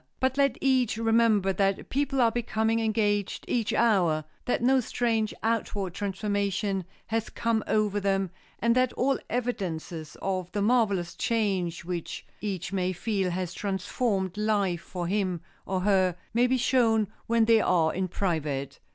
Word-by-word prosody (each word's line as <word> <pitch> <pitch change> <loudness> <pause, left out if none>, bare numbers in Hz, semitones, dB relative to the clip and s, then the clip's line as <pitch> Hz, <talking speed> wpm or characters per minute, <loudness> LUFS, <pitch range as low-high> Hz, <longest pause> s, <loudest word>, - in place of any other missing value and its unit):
But 260 0 +1
let 275 -3 +2
each 255 -5 +2
remember 225 -4 +3
that 195 +1 0
people 275 -1 +1
are 230 -1 +4
becoming 225 -1 0
engaged 210 -3 0
each 230 -3 0
hour, 180 -9 +3 0.2
that 245 - 0
no 265 +2 +5
strange 225 -2 0
outward 210 -5 -1
transformation 200 -1 -1 0.2
has 225 0 -2
come 230 -2 0
over 210 -1 +1
them, 195 -2 0 0.3
and 230 +2 +2
that 255 -1 +2
all 270 +1 +1
evidences 175 -10 -3
of 185 -2 -2
the 205 - 0
marvelous 205 -6 +2
change 190 -7 -1
which 175 -2 -5 0.2
each 195 -3 -3
may 185 -1 0
feel 195 0 -1
has 180 0 -3
transformed 195 0 -2
life 200 -5 +1
for 180 -1 -5
him 185 -2 -1 0.3
or 190 -1 -1
her 185 -3 +3 0.2
may 240 +2 +4
be 260 +1 +2
shown 230 -4 +3 0.2
when 230 -1 +3
they 225 -1 +5
are 165 -5 +2
in 185 +1 -1
private. 150 -7 -2
205 Hz, 150 wpm, -27 LUFS, 185-230 Hz, 0.3 s, no